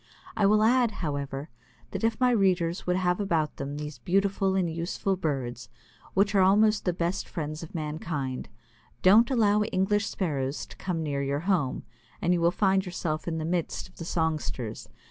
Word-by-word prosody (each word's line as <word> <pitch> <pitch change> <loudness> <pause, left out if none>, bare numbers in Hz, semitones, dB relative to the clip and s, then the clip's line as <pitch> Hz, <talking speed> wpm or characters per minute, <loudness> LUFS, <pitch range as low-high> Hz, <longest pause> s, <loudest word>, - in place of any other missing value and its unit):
I 205 - +3
will 215 +1 +4
add, 240 +1 +4 0.2
however, 140 0 -4 0.4
that - - -4
if 225 0 +1
my 250 -1 +4
readers 185 -6 +1
would 180 - +2
have 180 0 +1
about 165 -7 0
them 140 +1 -4
these 150 -3 -6
beautiful 195 +5 +1
and 185 -2 +2
useful 170 +4 -1
birds, 125 -8 -3 0.5
which 200 +2 +3
are 195 - +5
almost 210 +2 +4
the 180 - +3
best 175 +2 -2
friends 155 -1 -4
of 165 +1 -10
mankind, 150 -4 -3 0.5
don't 215 +6 +7
allow 210 -5 +3
English 205 +1 +1
Sparrows 140 -6 -2
to - - -13
come 170 -4 -2
near 140 -2 -1
your 140 +1 -1
home, 170 -7 0 0.4
and 175 - +2
you 175 - +1
will 170 - +5
soon 175 - -8
find 195 -1 +3
yourself 170 -3 -3
in 165 -1 -1
the 160 - -3
midst 170 0 -2
of - - -24
the 165 - -6
songsters. 155 -9 -2
175 Hz, 185 wpm, -27 LUFS, 150-195 Hz, 0.5 s, don't